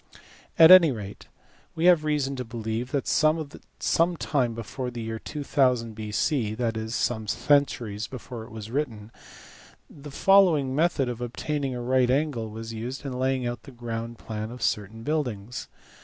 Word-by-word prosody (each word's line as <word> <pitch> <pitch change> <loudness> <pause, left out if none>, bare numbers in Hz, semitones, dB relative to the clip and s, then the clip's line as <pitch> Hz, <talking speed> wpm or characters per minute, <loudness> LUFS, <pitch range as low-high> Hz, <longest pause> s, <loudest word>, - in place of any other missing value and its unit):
At 160 +2 +9
any 175 -5 +9
rate 105 -5 -8 0.5
we 160 - 0
have 175 -4 +6
reason 145 -3 0
to 125 - -3
believe 115 +1 -4
that 140 - -1
some 160 +2 0
time 125 -8 0
before 120 +3 -5
the 120 -1 -7
year 110 0 -4
2000 130 -6 0
B.C. 110 +2 -1
(that 115 -1 -1
is 110 +1 -4
some 110 -3 -1
centuries 115 -5 +1
before 125 -2 -8
it - - -12
was 110 0 -8
written) 115 -6 -3 0.8
the 145 0 -12
following 160 -5 +4
method 155 -4 +2
of 120 -1 -5
obtaining 135 +2 -3
a 120 - -4
right 125 0 +2
angle 130 -5 0
was 115 +1 -7
used 125 +6 -6
in 135 - -3
laying 130 0 0
out 120 0 -3
the 140 - -13
ground 115 -1 -5
plan 110 0 -5
of 125 0 -7
certain 105 +2 -2
buildings. 125 -7 -3
125 Hz, 160 wpm, -26 LUFS, 115-145 Hz, 0.8 s, At